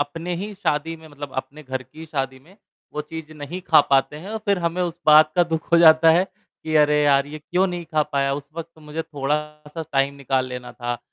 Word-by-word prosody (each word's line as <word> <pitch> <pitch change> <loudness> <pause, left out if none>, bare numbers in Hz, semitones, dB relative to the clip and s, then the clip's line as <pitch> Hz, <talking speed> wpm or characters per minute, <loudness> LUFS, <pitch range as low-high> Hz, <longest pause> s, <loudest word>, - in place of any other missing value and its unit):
अपने 165 +5 -3
ही 200 +5 -5
शादी 165 -4 -1
में 160 0 -15
मतलब 145 -2 -9
अपने 145 +3 -5
घर 130 -2 -4
की 160 +4 -12
शादी 135 -4 -3
में 175 +9 -21 0.4
वो 150 - -3
चीज़ 155 0 -9
नहीं 150 +4 -7
ख़ा - - +6
पाते 135 +2 +3
हैं 185 +6 -9
और 220 - -3
फिर 200 -2 +2
हमें 170 +1 -1
उस 175 -1 -3
बात 155 0 +7
का 175 - +6
दुख 165 -1 -4
हो 170 - +7
जाता 160 -1 +7
है 170 +3 +4 0.4
कि 155 - -2
अरे 150 0 +4
यार! 140 -1 +4
ये 150 +1 -8
क्यों 180 +5 0
नहीं 175 -2 -4
ख़ा 155 -1 +1
पाया। 140 -2 0
उस 140 0 -7
वक़्त 165 0 -8
मुझे 155 +1 -5
थोड़ा-सा 150 +1 -4
टाइम 135 0 +2
निकाल 135 -2 -1
लेना 125 -1 -7
था 120 -1 -4
150 Hz, 225 wpm, -22 LUFS, 140-165 Hz, 0.4 s, बात